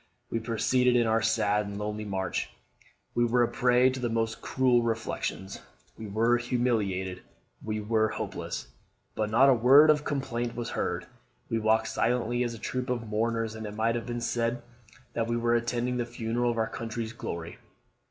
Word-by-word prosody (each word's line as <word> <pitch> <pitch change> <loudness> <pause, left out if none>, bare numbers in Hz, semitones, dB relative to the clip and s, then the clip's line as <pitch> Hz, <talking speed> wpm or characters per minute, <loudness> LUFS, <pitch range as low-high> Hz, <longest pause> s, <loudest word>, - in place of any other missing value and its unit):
We 115 - 0
proceeded 120 +2 +2
on 120 - +3
our 110 0 +2
sad 105 -2 +1
and 100 0 -6
lonely 105 +1 -4
march. 95 -3 -2 0.6
We 120 - +2
were 120 +1 +3
a - - +2
prey 125 0 +3
to 130 - -5
the 120 -1 -1
most 115 0 -1
cruel 125 -2 +2
reflections, 110 -4 -3 0.3
we 110 - -8
were 115 +4 +2
humiliated, 105 -7 -1 0.4
we 110 -1 -2
were 110 +1 +2
hopeless; - - -5 0.5
but 110 -1 -1
not 120 +5 +5
a - - +7
word 135 +6 +7
of 150 -1 +1
complaint 120 -5 -2
was 120 -1 -4
heard. - - -2 0.5
We 115 - +1
walked 110 0 +2
silently 120 +1 0
as 120 -1 -3
a - - -8
troop 125 +3 -3
of 120 -3 -2
mourners, 115 +1 0
and 110 -1 -6
it 105 - -7
might 115 +1 +1
have 120 0 -4
been 120 0 -3
said 120 0 -1 0.5
that 115 -1 -1
we 120 0 0
were 120 0 +1
attending 120 +1 0
the 120 - -1
funeral 120 +1 -1
of 120 - -1
our 110 - +2
country's 115 0 -5
glory. 85 -6 -6
115 Hz, 180 wpm, -28 LUFS, 110-120 Hz, 0.6 s, a